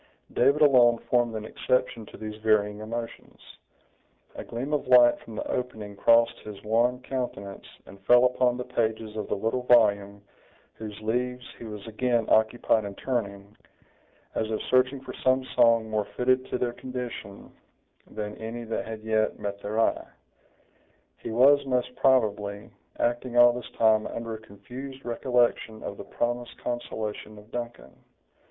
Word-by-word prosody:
David 140 +5 +4
alone 125 -4 +6
formed 120 -2 +2
an 110 -1 -5
exception 115 -1 -1
to - - -12
these 110 0 -8
varying 105 -1 +2
emotions. 115 +2 -7 0.9
A - - -7
gleam 130 +6 -5
of 150 - -1
light 125 -1 +6
from 110 - -11
the - - -4
opening 110 -5 -4
crossed 115 +3 +4
his 105 -2 -9
wan 120 +4 +1
countenance, 110 -8 -5 0.2
and 100 +1 -14
fell 125 +1 +7
upon 125 -1 +2
the 125 - -3
pages 110 -2 -2
of 105 -2 -4
the - - -1
little 115 +5 -1
volume, 100 -5 +3 0.5
whose 105 -2 -8
leaves 125 +3 -2
he - - -8
was 105 -2 -8
again 115 +1 0
occupied 110 0 +3
in 100 -1 -6
turning, 100 -5 -4 0.8
as 110 - -2
if 110 - -1
searching 130 +1 +3
for 130 - -8
some 130 0 +1
song 115 -1 +4
more 110 -1 -1
fitted 130 +1 +2
to - - -2
their 120 -1 -1
condition 125 -6 -7 0.6
than 105 0 -5
any 115 +2 -6
that 115 -1 -4
had 110 -1 -6
yet 110 -1 0
met 100 -1 -5
their 105 +2 -3
eye. 115 - +1 1.1
He - - -7
was, 135 +5 +5
most 125 -1 -1
probably, 105 -6 +1 0.3
acting 120 +1 -1
all 120 0 +8
this 125 -1 -7
time 110 -1 +4
under 115 -1 -5
a 110 - -8
confused 125 +6 -10
recollection 120 -2 0
of - - -6
the - - -7
promised 120 0 -3
consolation 110 -3 -5
of 105 +2 -16
Duncan. 120 - -6
115 Hz, 155 wpm, -27 LUFS, 110-125 Hz, 1.1 s, all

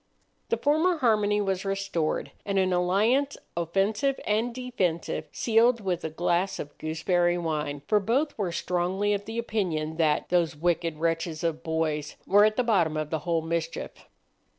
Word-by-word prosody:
The 465 - +1
former 315 +5 +2
harmony 210 -6 +2
was 190 -2 -1
restored, 195 -5 -2
and 200 -1 -1
an 185 -1 +2
alliance, 215 +11 +2 0.2
offensive 195 - 0
and 220 +3 +1
defensive, 235 -10 -2
sealed 235 +1 +3
with 185 -4 -2
a 160 - -2
glass 175 +4 0
of 145 - -7
gooseberry 175 +2 +1
wine, 150 -4 -3
for 210 - +4
both 265 +9 0
were 195 -5 -2
strongly 180 +4 0
of 200 0 -3
the 225 +1 -6
opinion 175 -9 -2
that 155 -3 +1
"those 170 -3 +2
wicked 165 0 0
wretches 165 0 -1
of 165 -1 -1
boys" 160 -2 -2
were 205 +2 +6
at 215 0 +2
the 250 - +1
bottom 175 -9 +2
of 155 -1 -3
the 160 - 0
whole 165 -1 +1
mischief. 165 0 -3
180 Hz, 160 wpm, -27 LUFS, 165-215 Hz, 0.2 s, were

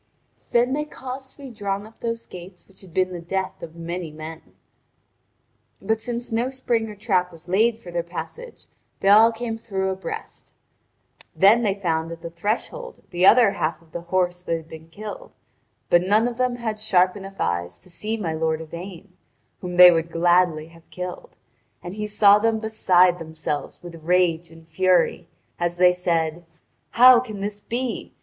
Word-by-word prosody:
Then 245 +2 +2
they 300 +1 0
caused 265 -2 -8
to - - -35
be 275 -3 -10
drawn 200 -2 -3
up 220 +1 -17
those 230 0 -4
gates 180 0 -12
which 195 - -16
had 190 -3 -15
been 185 +2 0
the 175 - -6
death 190 +2 -3
of 165 0 -9
many 170 0 -5
men. 155 +1 -9 1.4
But 220 0 -1
since 240 0 -5
no 235 +3 0
spring 235 -4 -1
or 210 - -9
trap 190 -4 0
was 165 0 -14
laid 220 +5 +2
for 185 -6 -11
their 170 0 -1
passage 325 - -8 0.4
they 195 - +3
all 220 +3 +7
came 225 0 -5
through 190 -4 -2
abreast. 190 -2 -8 0.8
Then 210 +5 +6
they 205 -4 +1
found 165 -4 -2
at 165 0 -9
the 170 - -6
threshold 225 - -4
the 180 +1 +3
other 230 -2 +7
half 160 -4 -2
of 165 -1 -25
the 170 - -5
horse 180 0 -1
that 170 -2 -1
had 160 -1 -12
been 160 0 -11
killed; 215 - -9 0.6
but 175 - +6
none 210 +5 +3
of 240 -1 -5
them 250 -1 0
had 220 -3 -4
sharp 185 -3 +2
enough 195 -1 -10
eyes 85 0 -2
to - - -15
see 215 +6 -3
my 170 -7 -3
lord 160 0 -1
Yvain, 175 +3 -9 0.5
whom 180 -1 -6
they 180 0 +11
would 165 0 0
gladly 170 -2 +2
have 165 0 -20
killed; 180 0 -7 0.5
and 175 - -6
he 210 +1 -4
saw 205 -1 +5
them 225 +1 +1
beside 185 -5 +3
themselves 160 -2 -5
with 170 -2 -10
rage 175 -1 +2
and 165 0 -16
fury, 185 +2 +1 0.3
as 175 0 -1
they 180 0 +6
said: 170 -2 -1 0.5
"How 250 +1 +8
can 215 -5 -7
this 205 +1 -4
be? 240 +3 -4
185 Hz, 180 wpm, -23 LUFS, 170-220 Hz, 1.4 s, they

